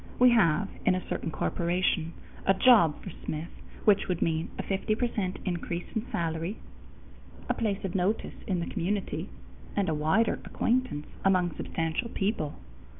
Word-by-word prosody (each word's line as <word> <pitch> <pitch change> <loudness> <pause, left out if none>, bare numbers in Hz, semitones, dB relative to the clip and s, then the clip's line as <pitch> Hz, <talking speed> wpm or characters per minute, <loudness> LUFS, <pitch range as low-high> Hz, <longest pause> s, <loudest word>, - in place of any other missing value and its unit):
We 250 0 +7
have, 200 -4 +4 0.2
in 185 - +4
a 185 - -4
certain - - -2
corporation, 170 0 0 0.3
a 195 - +6
job 190 - +5
for 190 - -6
Smith 155 +3 -4 0.3
which 205 -2 +5
would 180 -3 0
mean 160 0 0
a - - -2
50 200 +2 0
percent 215 -6 -1
increase 175 -1 -2
in 220 +2 -1
salary, 165 +4 -2 0.9
a - - +2
place 205 -4 -1
of 185 - -3
notice 195 +4 0
in 185 -3 0
the - - -2
community, 195 - -2 0.5
and 200 -4 +1
a - - +1
wider 160 +10 +2
acquaintance 240 -12 0 0.2
among 185 -3 +3
substantial 165 +9 -2
people. 195 -9 -1
185 Hz, 150 wpm, -29 LUFS, 165-210 Hz, 0.9 s, We